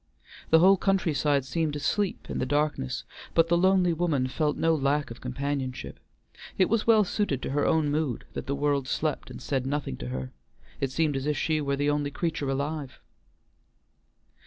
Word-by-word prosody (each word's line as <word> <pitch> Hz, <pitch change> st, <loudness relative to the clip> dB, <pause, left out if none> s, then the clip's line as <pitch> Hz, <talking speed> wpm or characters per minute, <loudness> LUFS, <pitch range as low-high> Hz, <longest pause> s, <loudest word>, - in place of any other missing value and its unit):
The 160 Hz, -, +7 dB
whole 190 Hz, +4 st, +6 dB
country 190 Hz, -4 st, +1 dB
side 140 Hz, -1 st, +1 dB
seemed 155 Hz, +2 st, -1 dB
asleep 180 Hz, +7 st, -1 dB
in -, -, -3 dB
the -, -, 0 dB
darkness, 145 Hz, -, -1 dB, 0.3 s
but 165 Hz, 0 st, +4 dB
the 170 Hz, -, +4 dB
lonely 185 Hz, 0 st, +4 dB
woman 160 Hz, -6 st, +1 dB
felt 150 Hz, +3 st, -1 dB
no 165 Hz, 0 st, +3 dB
lack 145 Hz, -2 st, 0 dB
of 115 Hz, -, -10 dB
companionship; 130 Hz, 0 st, -4 dB, 0.6 s
it 185 Hz, -, +3 dB
was 230 Hz, 0 st, +1 dB
well 220 Hz, -2 st, +6 dB
suited 190 Hz, -, -1 dB
to -, -, -3 dB
her 145 Hz, +1 st, +1 dB
own 155 Hz, -2 st, +2 dB
mood 145 Hz, -6 st, -1 dB
that -, -, -5 dB
the 140 Hz, -, 0 dB
world 140 Hz, -2 st, 0 dB
slept 155 Hz, +3 st, -2 dB
and -, -, -8 dB
said 135 Hz, -2 st, -2 dB
nothing 140 Hz, -, -2 dB
to -, -, -6 dB
her, 65 Hz, 0 st, -4 dB, 0.5 s
it 135 Hz, -, 0 dB
seemed 150 Hz, +2 st, 0 dB
as 135 Hz, +1 st, -2 dB
if 150 Hz, -1 st, 0 dB
she 155 Hz, -1 st, 0 dB
were 140 Hz, -1 st, 0 dB
the 145 Hz, +1 st, +1 dB
only 145 Hz, -1 st, 0 dB
creature 160 Hz, -2 st, -2 dB
alive. 140 Hz, 0 st, -3 dB
145 Hz, 185 wpm, -27 LUFS, 135-165 Hz, 0.6 s, The